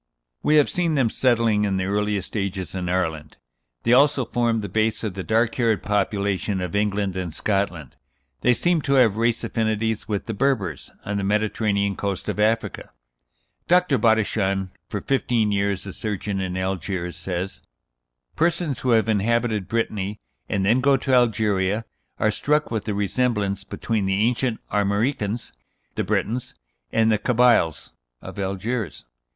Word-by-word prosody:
We 150 - +3
have 150 -2 +5
seen 170 -3 0
them 125 -6 +2
settling, 115 -4 +2
in 100 -2 0
the 95 - 0
earliest 105 0 -1
ages, 95 -5 -3
in 90 -2 -3
Ireland. 80 -4 -2 0.5
They 120 - +3
also 140 0 +4
formed 115 -2 0
the - - -3
base 110 +1 0
of 105 -4 -2
the 95 - -5
dark 115 +4 +1
haired 115 -4 +1
population 100 -1 0
of 90 -1 -4
England 100 -2 0
and 90 -3 -3
Scotland. 90 - -2 0.4
They 125 0 +3
seem 175 +2 +1
to 140 -1 0
have 120 -6 +5
race 115 +1 +1
affinities 110 -1 -1
with 105 -2 -2
the 115 - -3
Berbers, 100 - -1 0.2
on 100 0 -2
the 100 - -1
Mediterranean 100 -1 0
coast 100 -1 -3
of - - -3
Africa. 110 +2 0 0.8
Dr. 180 -7 +3
Bodichon, 100 -4 +1 0.2
for - - -3
fifteen 120 -5 +1
years 100 -1 0
a 95 - -6
surgeon 105 -2 -3
in 95 -1 -3
Algiers, 95 -1 -3
says: 90 +1 -4 0.7
"Persons 165 -5 +1
who 130 - -2
have 110 -1 +3
inhabited 110 -1 +1
Brittany, 105 -3 -2 0.3
and 100 -2 0
then 115 +6 +3
go 135 +1 +4
to 135 +1 -1
Algeria, 110 -3 +2 0.3
are 110 - +2
struck 150 +6 0
with 110 -3 -2
the 105 - -2
resemblance 105 -1 0
between 110 -4 -2
the 95 - +1
ancient 115 +3 +1
Armoricans 105 +2 0 0.4
(the - - -1
Brètons) 120 +3 -2 0.4
and 115 0 +3
the 105 - +2
Cabyles 120 - +2 0.3
(of - - -9
Algiers). 100 - -3
105 Hz, 155 wpm, -23 LUFS, 95-115 Hz, 0.8 s, have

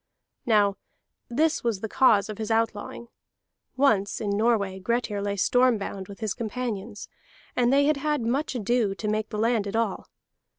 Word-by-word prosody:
"Now 205 -3 +3 0.5
this 310 +6 +1
was 225 -5 -1
the 220 - -3
cause 215 -3 +4
of 215 -1 -7
his 220 0 -3
outlawing. 225 +1 -2 0.7
Once 215 -8 +2
in 205 -2 -2
Norway 200 -3 +1
Grettir 215 0 -1
lay 200 0 -2
storm 245 +4 +3
bound 195 -1 -6
with 200 +2 -11
his 215 -3 -1
companions, 225 -3 -5 0.5
and 245 0 +3
they 280 +1 +4
had 300 0 +2
had 300 -1 -1
much 265 +5 -1
ado 230 -3 0
to 210 - -5
make 215 +1 -1
the 215 - -5
land 225 -1 +1
at 200 - -4
all. 225 -4 -1
225 Hz, 170 wpm, -26 LUFS, 205-245 Hz, 0.7 s, cause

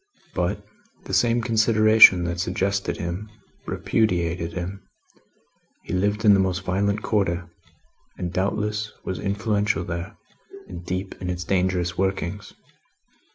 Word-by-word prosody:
But, - - -2 0.4
the - - -8
same 120 0 +2
consideration 110 -4 +6
that 85 0 -3
suggested 100 +2 -1
him, 90 +5 -5 0.4
repudiated 85 -5 0
him; 90 +3 -5 1.0
he - - -6
lived 105 +4 0
in 105 - +8
the 100 - +4
most 95 0 0
violent 100 +3 0
Quarter, 90 -5 0 0.7
and 90 -1 -4
doubtless 105 +2 -1
was 95 - -4
influential 100 0 0
there, 85 +4 -6 0.5
and 85 - -8
deep 95 +2 -4
in 90 - -3
its 90 0 -3
dangerous 90 -2 0
workings. 95 +1 -2
95 Hz, 120 wpm, -24 LUFS, 90-105 Hz, 1.0 s, in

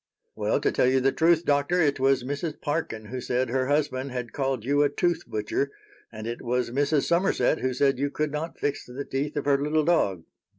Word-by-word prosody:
"Well, - - 0
to - - +2
tell - - +2
you 130 +1 +3
the 135 +1 +2
truth, 165 +2 +3
Doctor, 145 +5 +2
it 145 -4 +2
was 135 -1 +3
Mrs. 145 +4 -4
Parkin 145 -8 -3
who 125 +4 -5
said 125 0 -1
her 130 0 0
husband 140 -2 0
had 125 -2 -5
called 135 -5 -1
you 145 +2 +2
a 145 - +4
'tooth 175 +1 -1
butcher,' 110 +6 -1 0.4
and 110 -1 -8
it 120 +1 -4
was 125 0 -1
Mrs. 140 +2 +1
Somerset 170 -2 +2
who 130 - 0
said 135 0 +1
you 145 +1 0
could 150 +1 -2
not 155 +3 -4
fix 145 - -2
the 130 +3 -7
teeth 140 +3 -3
of 145 - -2
her 140 -1 +3
little 150 +1 +1
dog." 100 - +2
140 Hz, 215 wpm, -26 LUFS, 125-150 Hz, 0.4 s, a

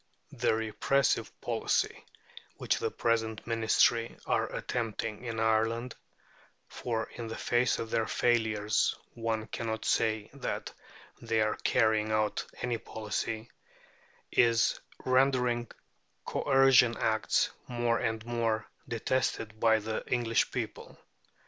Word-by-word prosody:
The - - +1
repressive 110 +5 +1
policy - - 0 0.5
which - - 0
the - - 0
present 115 -1 -1
Ministry 115 0 +2
are - - +1
attempting 115 -2 -3
in 115 -2 -3
Ireland 115 +2 +1 0.7
for 115 -2 -3
in 120 -2 -6
the 110 - -5
face 120 +1 +2
of 115 -1 -5
their 115 - +1
failures 110 -3 +1 0.2
one 115 -1 -2
cannot 110 -1 -4
say 110 -1 +1
that 140 - -4 0.5
they 115 -1 0
are 110 0 +1
carrying 110 -2 +2
out 110 -1 +1 0.2
any 120 -2 -1
policy 110 +1 -4 0.8
is 115 0 +3 0.3
rendering 130 -2 +2 0.6
Coercion 135 -4 +4
Acts 110 -1 +1 0.2
more 120 -2 0
and 110 0 -2
more 115 -2 0 0.2
detested 115 -2 -1
by 110 -1 +5
the 110 +1 -3
English 120 -2 +2
people. - - -5
115 Hz, 110 wpm, -30 LUFS, 110-120 Hz, 0.8 s, by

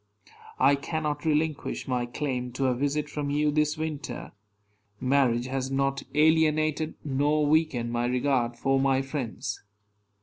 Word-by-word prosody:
I 135 +2 +5
cannot 150 +1 -2
relinquish 155 -1 -1
my 125 -2 -1
claim 125 -1 -3
to 135 +2 -1
a 130 - +3
visit 145 +4 -1
from 145 -1 -3
you 150 +1 +2
this 150 +1 +1
winter. 155 -4 -5 0.7
Marriage 125 -2 +2
has 130 0 -2
not 135 0 0
alienated 155 0 +3
nor 145 +2 +2
weakened 145 -6 +1
my 120 0 0
regard 125 -1 +1
for 135 +2 +1
my 135 0 +2
friends. 135 -4 -4
140 Hz, 135 wpm, -27 LUFS, 130-150 Hz, 0.7 s, I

